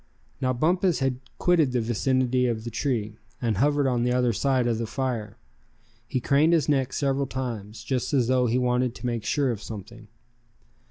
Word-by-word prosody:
Now 130 -1 +1
Bumpus 175 +7 +2
had 135 -2 -1 0.2
quitted 165 -7 +3
the 125 - +2
vicinity 125 +2 +1
of 110 -2 -2
the 120 - -5
tree, 110 -4 -2 0.2
and 115 -5 -1
hovered 145 +4 +2
on 125 -3 +1
the 125 +1 +1
other 125 -1 +2
side 130 +2 +1
of 115 -2 0
the 115 - -2
fire. 120 -5 -3 0.7
He 130 - -1
craned 145 +6 +3
his 160 -5 +2
neck 135 -3 +1
several 140 -1 0
times, 115 -5 -5
just 130 -3 -2
as 130 -5 +2
though 125 -1 +3
he 120 +2 +1
wanted 125 0 +1
to - - -8
make 120 -3 -2
sure 140 0 +1
of 110 -3 -5
something. 110 +1 -9
125 Hz, 185 wpm, -26 LUFS, 115-135 Hz, 0.7 s, quitted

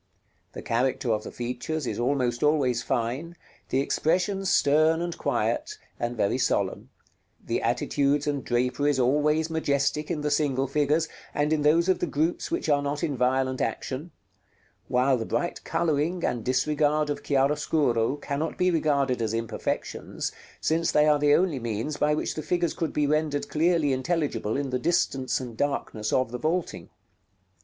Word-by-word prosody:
The - - -8
character 125 +1 0
of 105 - -1
the - - -8
features 125 +5 -4
is - - -3
almost 125 -1 0
always 140 -6 +2
fine, 130 +7 -2 0.3
the 135 - +2
expression 185 +7 0
stern 155 -1 +3
and 175 0 -3
quiet, 425 - -1 0.2
and 120 0 -2
very 100 +5 +1
solemn, 100 -6 0 0.6
the - - -1
attitudes 140 +1 +1
and 145 -2 -1
draperies 125 +3 +1
always 150 +5 +2
majestic 150 -1 0
in 160 -4 -2
the 150 0 -1
single 140 -3 +1
figures, 150 +3 +1 0.3
and 150 +1 +1
in 155 - +1
those 160 +4 +4
of 185 - +2
the 175 - -1
groups 160 +3 -1
which 335 - -2
are 145 -2 +3
not 145 +3 -3
in 150 -4 0
violent 130 +1 +1
action; 140 +6 -3 0.8
while 130 +1 +2
the 115 - -3
bright 175 - -2
coloring 165 +2 0
and 120 -2 -1
disregard 150 +4 +1
of 145 - -4
chiaroscuro 140 -3 +1
cannot 145 +2 -3
be 180 0 +3
regarded 140 -6 +1
as 110 0 -1
imperfections, 115 -1 -3 0.3
since 165 +1 +1
they 150 - +4
are 150 -1 +4
the 145 0 +5
only 175 -6 +1
means 115 +5 -3
by 150 0 +2
which - - -2
the 155 - -4
figures 170 +1 0
could 165 - -2
be 150 - +1
rendered 150 -1 0
clearly 160 -3 +2
intelligible 130 -6 -1
in 140 -2 -2
the 125 - 0
distance 135 -4 0
and 125 -3 -7
darkness 115 -6 -2
of 130 -3 +1
the 125 - -4
vaulting. 165 +4 -2
145 Hz, 165 wpm, -26 LUFS, 130-155 Hz, 0.8 s, the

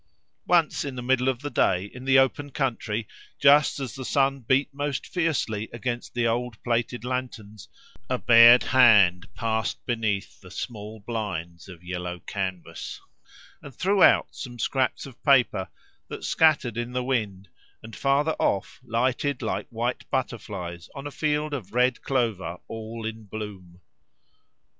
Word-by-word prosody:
Once 170 -3 +3
in 140 -2 -5
the 125 - -5
middle 130 +1 +2
of 130 -1 -2
the 145 - -3
day, 90 +2 +2
in 125 +5 -11
the 135 0 +5
open 145 +2 +2
country, 115 -6 -2 0.3
just 145 +1 +5
as 130 -4 -4
the 130 - -7
sun 135 +3 +1
beat 130 +3 +2
most 145 -1 -3
fiercely 135 - -1
against 120 0 -4
the 120 -1 +1
old 120 +1 -1
plated 120 0 -1
lanterns, 110 -6 -5 0.4
a 130 - +1
bared 120 +1 +8
hand 105 -9 +5
passed 110 -1 -2
beneath 110 -5 -2
the 90 - -13
small 105 +2 -7
blinds 100 -6 -5
of 90 -2 -12
yellow 90 0 -4
canvas, 95 -4 -5 0.6
and 140 -4 -11
threw 195 +5 +1
out - - +6
some 120 -2 -8
scraps 130 +1 -1
of 130 -4 -13
paper 125 -9 +3 0.4
that - - -8
scattered 140 -8 +2
in 120 +1 -3
the 125 0 -1
wind, 105 -7 -2 0.4
and 110 -1 -10
farther 140 +3 +2
off 105 +3 -1
lighted 130 +4 -1
like 105 -2 -2
white 120 +1 -3
butterflies 100 - -4
on 140 0 -7
a 145 - -5
field 150 0 -1
of 110 -6 -6
red 125 0 +2
clover 110 -9 -1
all 115 0 -7
in 110 0 -6
bloom. 95 -4 -8
120 Hz, 150 wpm, -25 LUFS, 105-130 Hz, 0.6 s, bared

